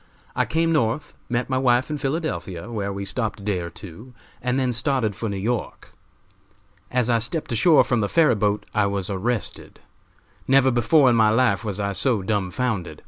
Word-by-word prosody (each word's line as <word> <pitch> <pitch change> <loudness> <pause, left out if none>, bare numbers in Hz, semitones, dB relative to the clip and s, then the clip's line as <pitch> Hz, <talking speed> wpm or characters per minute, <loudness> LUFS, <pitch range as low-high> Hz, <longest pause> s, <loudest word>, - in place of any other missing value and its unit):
I - - +1
came 165 +1 0
North, 130 -1 0 0.2
met 120 +1 -1
my 130 -1 0
wife 130 +3 +2
in 150 - -3
Philadelphia, 120 - -3
where 100 -3 -3
we 100 0 -5
stopped 110 0 -3
a - - -11
day 100 -3 -1
or 85 -1 -5
two, 105 +9 -12 0.3
and 125 +1 -1
then 130 -2 0
started 120 -4 0
for 110 +5 -4
New 100 - -3
York. 110 +4 -4 1.0
As 125 -2 0
I 120 -2 +2
stepped 150 +8 -2
ashore 145 +8 +5
from 120 - 0
the 100 - -1
ferry 165 -6 +4
boat 105 -1 0
I 105 -1 +2
was 100 0 -2
arrested. 105 +3 -3 0.7
Never 135 0 +4
before 125 +4 +4
in 120 - +4
my 110 -2 +4
life 120 +2 +2
was 105 -2 -3
I 100 0 -1
so 105 +1 +1
dumbfounded. 100 -3 -2
115 Hz, 190 wpm, -23 LUFS, 100-130 Hz, 1.0 s, ashore